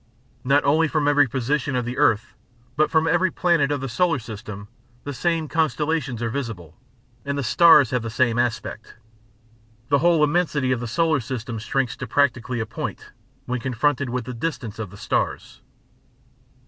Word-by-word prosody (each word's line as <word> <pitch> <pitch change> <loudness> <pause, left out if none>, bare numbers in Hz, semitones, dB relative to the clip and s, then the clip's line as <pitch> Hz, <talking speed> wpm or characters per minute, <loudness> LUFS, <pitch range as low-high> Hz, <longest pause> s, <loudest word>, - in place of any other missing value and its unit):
Not 140 +3 +3
only 155 +3 +3
from 150 -1 0
every 145 -2 +4
position 135 +2 -1
of 125 -1 -1
the 120 +2 -4
earth, 120 -6 +2 0.4
but 155 +2 +2
from 160 0 +2
every 175 +3 +2
planet 165 -4 +1
of 145 -2 -1
the 135 - -3
solar 165 +5 +1
system, 105 -3 -8 0.4
the 145 - -5
same 165 +2 -1
constellations 150 -4 -1
are 115 - -1
visible, 115 - -5 0.5
and 140 0 -3
the 140 - -1
stars 160 - +6
have 125 -1 0
the 115 - -5
same 120 +1 +1
aspect. 115 -2 -3 0.9
The 140 -1 +4
whole 165 -1 +3
immensity 150 -4 +1
of 125 - +1
the 120 - -4
solar 160 +5 +1
system 115 -1 -5
shrinks 125 +1 -1
to 130 - -6
practically 125 -1 0
a 110 - -1
point - - -6 0.3
when 125 0 -2
confronted 130 +2 0
with 125 -1 -3
the 125 - -6
distance 115 -5 -4
of 105 -3 -4
the 100 - -13
stars. - - -3
135 Hz, 175 wpm, -23 LUFS, 120-150 Hz, 0.9 s, stars